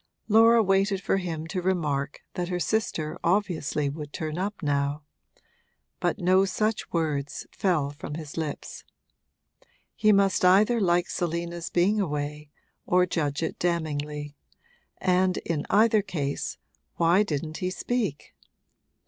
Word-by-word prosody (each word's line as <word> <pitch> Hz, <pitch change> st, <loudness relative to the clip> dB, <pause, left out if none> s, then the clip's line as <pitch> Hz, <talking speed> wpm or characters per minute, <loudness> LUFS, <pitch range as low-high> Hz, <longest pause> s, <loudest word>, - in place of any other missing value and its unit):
Laura 225 Hz, +1 st, +6 dB
waited 195 Hz, 0 st, +2 dB
for 195 Hz, -, 0 dB
him 165 Hz, -4 st, -4 dB
to 180 Hz, +2 st, -3 dB
remark 150 Hz, -6 st, -1 dB
that 175 Hz, -1 st, -2 dB
her 180 Hz, 0 st, -2 dB
sister 175 Hz, -7 st, -1 dB
obviously 170 Hz, -6 st, 0 dB
would 145 Hz, +1 st, -5 dB
turn 155 Hz, 0 st, -4 dB
up 195 Hz, +1 st, -3 dB
now; 145 Hz, 0 st, 0 dB, 1.0 s
but -, -, 0 dB
no 185 Hz, +2 st, +4 dB
such 215 Hz, +3 st, -1 dB
words 145 Hz, -4 st, -2 dB
fell 155 Hz, -7 st, 0 dB
from 145 Hz, 0 st, -7 dB
his 155 Hz, -2 st, -7 dB
lips. 155 Hz, -3 st, -5 dB, 1.1 s
He 215 Hz, -1 st, +4 dB
must 195 Hz, -2 st, +3 dB
either 210 Hz, +6 st, +5 dB
like 175 Hz, -2 st, +2 dB
Selina's 170 Hz, 0 st, -3 dB
being 200 Hz, +5 st, +2 dB
away 150 Hz, -3 st, -3 dB, 0.4 s
or 180 Hz, 0 st, +4 dB
judge 150 Hz, -5 st, -1 dB
it -, -, -3 dB
damningly, 150 Hz, -4 st, -2 dB, 0.6 s
and 185 Hz, 0 st, +2 dB
in 155 Hz, -3 st, -2 dB
either 215 Hz, +1 st, +4 dB
case 145 Hz, -8 st, -3 dB, 0.4 s
why 170 Hz, +4 st, +4 dB
didn't 155 Hz, -5 st, -2 dB
he 180 Hz, -, -2 dB
speak? 205 Hz, -, -3 dB
175 Hz, 130 wpm, -26 LUFS, 150-195 Hz, 1.1 s, Laura